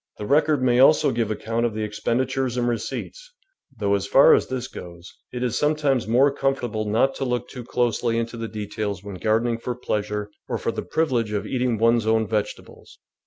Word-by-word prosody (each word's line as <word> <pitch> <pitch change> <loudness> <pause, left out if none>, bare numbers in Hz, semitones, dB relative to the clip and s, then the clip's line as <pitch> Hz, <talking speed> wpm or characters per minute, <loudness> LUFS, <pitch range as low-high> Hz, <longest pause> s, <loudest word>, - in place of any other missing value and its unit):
The 105 - -5
record 150 +1 +2
may 125 -1 +3
also 135 +1 +5
give 115 -3 -1
account 115 +2 -2
of 115 -3 -1
the 110 0 -2
expendi 105 +4 0
tures 130 -2 -2
and 120 0 +1
receipts, 120 - -4 0.4
though, 100 -2 0
as 100 0 0
far 135 - +7
as - - +2
this 130 -1 -4
goes, 85 0 -11 0.2
it 125 0 -4
is 120 -3 0
sometimes 145 -6 +1
m.ore 130 +5 +4
comfortable 125 -6 -1
not 115 +6 +2
to - - -3
look 125 -2 -2
too 125 - -10
THE 120 - -7
VEGETABLE - - -19
GARDEN 120 - +2
closely 115 +1 -1
into 115 0 -3
the 115 0 -4
details 105 -2 -4
when 100 -1 -7
gardening 115 +3 +1
for 125 +1 -4
pleasure 105 -3 -3 0.2
or - - -1
for - - -2
the - - -4
privilege 125 -9 0
of 105 - -2
eating 125 -3 0
one's 115 0 +2
own 110 0 +3
vegetables. 105 -1 -5
115 Hz, 215 wpm, -23 LUFS, 110-130 Hz, 0.4 s, far